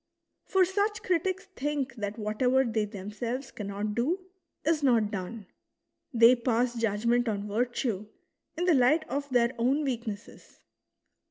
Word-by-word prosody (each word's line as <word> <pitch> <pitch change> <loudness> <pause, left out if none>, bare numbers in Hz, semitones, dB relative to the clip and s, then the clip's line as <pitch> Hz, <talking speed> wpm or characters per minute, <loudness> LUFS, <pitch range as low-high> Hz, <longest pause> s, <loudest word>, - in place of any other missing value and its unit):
For 380 -1 +3
such 405 +3 -1
critics 370 +1 0
think 280 -2 -2
that 205 0 -4
whatever 250 +5 +2
they 225 -3 0
themselves 225 +5 -5
cannot 205 0 -4
do, 280 - 0 0.5
is 315 -1 +2
not 230 -6 +3
done; 200 +2 -5 0.7
they 235 0 +7
pass 240 0 +1
judgment 230 +1 +1
on 205 -1 -3
virtue 225 -1 -1 0.5
in 350 - 0
the 360 - +5
light 285 +4 +4
of 285 0 -3
their 240 -2 +3
own 270 +6 +2
weak 245 -4 -2
nesses. 205 0 -8
240 Hz, 140 wpm, -29 LUFS, 215-280 Hz, 0.7 s, they